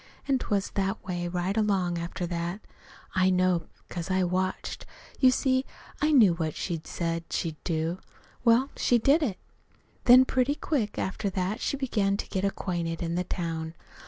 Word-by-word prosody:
An' 270 -2 +2
't - - -6
was 200 -2 0
that 195 -1 -1
way 175 -2 -2
right 180 +2 -1
along 190 -5 +1
after 170 +1 -4
that. 175 +3 -3 0.5
I 185 0 +3
know, 185 -2 +2 0.2
'cause 175 0 -5
I 185 0 +2
watched. 185 +1 -2 0.4
You 260 - +7
see, 260 0 +2 0.4
I 305 +1 +3
knew 225 - +6
what 160 -2 -2
she'd 165 -3 -4
said 165 -1 -2
she'd 160 -3 -3
do. 165 +1 -1 0.4
Well, 240 +3 +4
she 245 - +3
did 275 +8 +4
it. 225 -11 -1 0.7
"Then, 255 +1 +8
pretty 260 +2 +1
quick 260 -10 -1
after 200 +2 -2
that, 190 +4 -2
she 280 - -1
began 210 -7 0
to - - -4
get 190 - -2
acquainted 175 -4 -2
in 165 0 -2
the 180 +1 0
town. 165 -2 -4
185 Hz, 170 wpm, -28 LUFS, 170-230 Hz, 0.7 s, Then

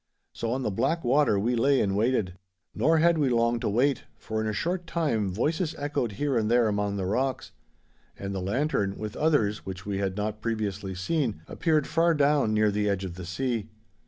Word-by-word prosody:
So 115 - -3
on 130 +2 -1
the 105 - -1
black 135 - 0
water 130 -3 +3
we 115 +5 +1
lay 135 +3 +3
and 100 -1 +1
waited. 110 -4 +1 0.4
Nor 160 +2 +3
had 165 0 +4
we 140 -3 +2
long 115 0 +2
to - - -1
wait, 130 +6 +1
for 110 0 -3
in 110 - -2
a - - 0
short 175 - -2
time 140 - 0
voices 155 - -1
echoed 145 -6 -2
here 145 +4 -1
and 110 -2 +1
there 120 -1 +4
among 105 -1 -1
the 95 - -2
rocks, 130 +7 -1 0.7
and 100 0 -5
the 95 - -3
lantern, 100 -1 0
with 105 -1 -5
others 130 -10 +1
which 95 0 -7
we 100 -1 -2
had 95 -1 -2
not 105 +1 -3
previously 105 -4 -3
seen, 110 - -1
appeared 155 -4 +1
far 165 +2 +2
down 145 -5 +3
near 110 -1 +3
the 105 0 0
edge 100 -1 -1
of 90 - -6
the 90 0 -8
sea. 115 +2 -2
115 Hz, 205 wpm, -27 LUFS, 100-145 Hz, 0.7 s, had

